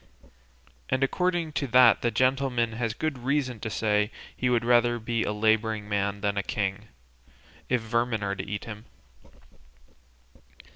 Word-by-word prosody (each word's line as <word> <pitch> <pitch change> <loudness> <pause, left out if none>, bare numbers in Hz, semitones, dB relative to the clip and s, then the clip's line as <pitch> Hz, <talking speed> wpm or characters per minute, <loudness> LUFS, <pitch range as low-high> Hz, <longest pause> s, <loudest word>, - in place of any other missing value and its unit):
And 130 +1 +1
according 175 +2 0
to 140 0 -1
that 125 -1 +6
the 120 - +1
gentleman 130 0 +1
has 115 0 -3
good 155 -2 -2
reason 130 -2 -1
to 110 - -4
say 105 -1 +1 0.3
he 125 - 0
would 120 -1 +1
rather 120 0 +4
be 115 0 -2
a - - -1
labouring 110 0 +1
man 100 0 -1
than 100 -1 -1
a - - +2
king, 100 +2 -3 0.8
if 125 -2 +1
vermin 115 -1 -1
are 100 0 -1
to 95 - -5
eat 100 +1 -5
him." 105 0 -9
115 Hz, 150 wpm, -27 LUFS, 105-125 Hz, 0.8 s, that